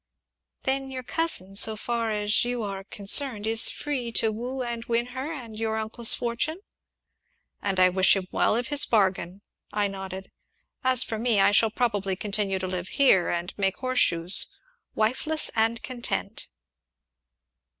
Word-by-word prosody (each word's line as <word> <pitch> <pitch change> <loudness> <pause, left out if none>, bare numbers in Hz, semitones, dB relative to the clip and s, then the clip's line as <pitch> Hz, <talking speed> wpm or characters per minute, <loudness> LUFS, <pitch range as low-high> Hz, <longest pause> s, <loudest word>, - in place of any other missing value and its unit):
"Then 270 0 0
your 260 -1 -5
cousin, 240 - -1
so 215 +2 +1
far 230 +1 -2
as 210 0 +1
you 240 -1 -2
are 195 -1 -4
concerned, 210 +3 +1
is 225 0 +5
free 260 -5 -3
to 225 - +2
woo 250 +4 -4
and 235 -1 -4
win 235 0 +1
her 265 +4 -4
and 240 -8 -7
your 220 0 -1
uncle's 220 +1 0
fortune?" 245 +7 -2 1.0
"And 195 -2 -1
I 185 0 +7
wish 190 +2 +4
him 190 -2 -3
well - - +2
of 245 +2 -2
his 290 -1 +2
bargain!" 195 -3 +1 0.3
I 210 -1 +1
nodded. 190 -1 -7 0.5
"As 255 -1 +5
for 220 -2 -4
me, 230 -3 +3
I 195 - +5
shall 220 +2 +4
probably 205 -5 0
continue 200 -1 -1
to 185 - -3
live 180 -1 -4
here, 225 -10 +5
and 175 +1 -2
make 195 -1 +1
horseshoes 185 -9 +1 0.4
wifeless 260 +8 0
and 225 +1 +1
content." 250 -2 -4
220 Hz, 155 wpm, -26 LUFS, 195-245 Hz, 1.0 s, I